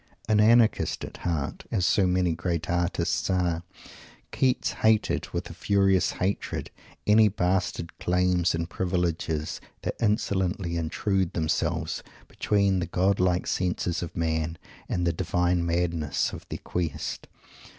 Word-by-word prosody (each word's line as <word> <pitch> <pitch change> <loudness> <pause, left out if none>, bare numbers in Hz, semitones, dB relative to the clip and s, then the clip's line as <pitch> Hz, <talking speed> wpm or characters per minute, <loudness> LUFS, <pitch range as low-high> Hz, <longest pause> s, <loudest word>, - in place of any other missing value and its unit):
An 110 -1 +3
anarchist 115 +1 +4
at - - -10
heart 80 -6 -3
as 95 -5 +1
so 95 0 +3
many 90 -2 +2
great 85 -1 -2
artists 85 +1 0
are 90 -3 +1 0.7
Keats 130 -2 +1
hated, 110 -1 +2
with - - -4
a - - -9
furious 95 -2 +2
hatred, 95 +2 -2 0.3
any 110 +1 +6
bastard 90 -3 -1
claims 90 -1 +2
and 85 0 -2
privileges 85 -3 -2 0.2
that - - -4
insolently 95 -4 0
intruded 90 +3 0
themselves 80 -2 -1 0.3
between 100 -2 +1
the 85 - -2
godlike 90 0 +2
senses 90 -1 -1
of 85 - -6
Man 80 0 -1 0.3
and 90 -1 0
the 85 - +2
divine 90 +1 +1
madness 85 -3 0
of - - -9
their - - -4
quest. 85 -5 -4
90 Hz, 130 wpm, -27 LUFS, 85-95 Hz, 0.7 s, any